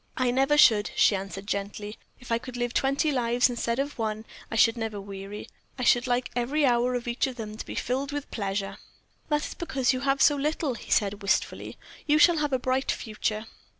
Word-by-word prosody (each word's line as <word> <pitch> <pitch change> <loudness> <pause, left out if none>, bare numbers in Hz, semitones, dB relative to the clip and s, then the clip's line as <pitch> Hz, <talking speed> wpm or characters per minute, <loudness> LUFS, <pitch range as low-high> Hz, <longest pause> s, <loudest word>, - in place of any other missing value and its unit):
"I 255 -1 +2
never 270 +4 +2
should," 215 -7 +6
she 205 - +4
answered, 195 0 -6
gently. 205 +1 -4 0.2
"If 250 - -11
I 230 - +2
could 250 +1 -8
live 240 0 -2
twenty 275 +3 +1
lives, 245 -1 +2
instead 235 0 -2
of 280 -1 -3
one, 220 0 -2 0.2
I - - -4
should 225 +1 +5
never 225 -3 -4
weary. 195 +1 -8 0.3
I 255 - -3
should 245 +1 +4
like 245 0 0
every 275 +5 +1
hour 245 0 +2
of 245 -1 -4
each 240 +3 0
of 260 - -6
them 215 -3 -6
to - - -6
be - - -8
filled 270 +3 -2
with 290 0 -5
pleasure." 195 -2 -3 0.5
"That 300 0 +1
is - - -6
because 270 -7 0
you 255 - -2
have 275 +1 +1
had - - -4
so 290 - +5
little," 295 -1 -1
he 235 - -11
said, 205 0 +1
wistfully. 200 - -1 0.3
"You 300 0 +4
shall 340 +1 +6
have 295 -1 0
a 260 - +2
bright 260 +1 0
future." 215 -1 -3
245 Hz, 215 wpm, -27 LUFS, 215-270 Hz, 0.5 s, should